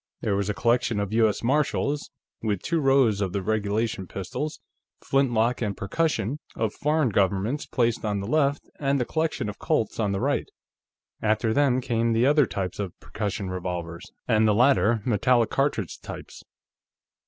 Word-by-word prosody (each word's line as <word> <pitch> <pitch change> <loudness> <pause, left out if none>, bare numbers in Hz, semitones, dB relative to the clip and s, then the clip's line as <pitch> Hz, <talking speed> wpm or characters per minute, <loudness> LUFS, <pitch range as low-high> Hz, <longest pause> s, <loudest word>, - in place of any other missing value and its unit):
There 100 - 0
was 100 +1 -1
a 105 - -1
collection 120 -1 +1
of 100 +1 -2
U.S. 110 -2 +2
Martials, 145 +2 0 0.3
with 105 -4 -1
two 165 -1 0
rows 135 -7 +3
of 95 -3 -1
the 100 - -2
regulation 105 -1 -1
pistols, 145 +11 -5 0.5
flintlock 125 -3 +2
and 105 -4 -2
percussion, 125 +3 -1 0.2
of 110 -2 -1
foreign 150 -2 +1
governments, 100 +7 0
placed 120 -3 0
on 105 -2 -1
the 100 - -4
left, 140 +3 +1
and 140 -1 +1
the 125 - 0
collection 160 -6 -1
of 105 - -6
Colts 110 - 0
on 105 -3 +1
the 100 - -1
right. - - 0 0.7
After 110 +1 +1
them 135 -2 +3
came 115 -1 0
the 115 +2 +3
other 145 -1 +4
types 95 -2 -4
of 100 -4 -5
percussion 100 -2 -4
revolvers, 85 -2 -5 0.2
and 110 0 +4
the 105 - +3
later 120 -3 +3
metallic 120 +1 +2
cartridge 135 - -1
types. - - -9
110 Hz, 165 wpm, -25 LUFS, 100-135 Hz, 0.7 s, other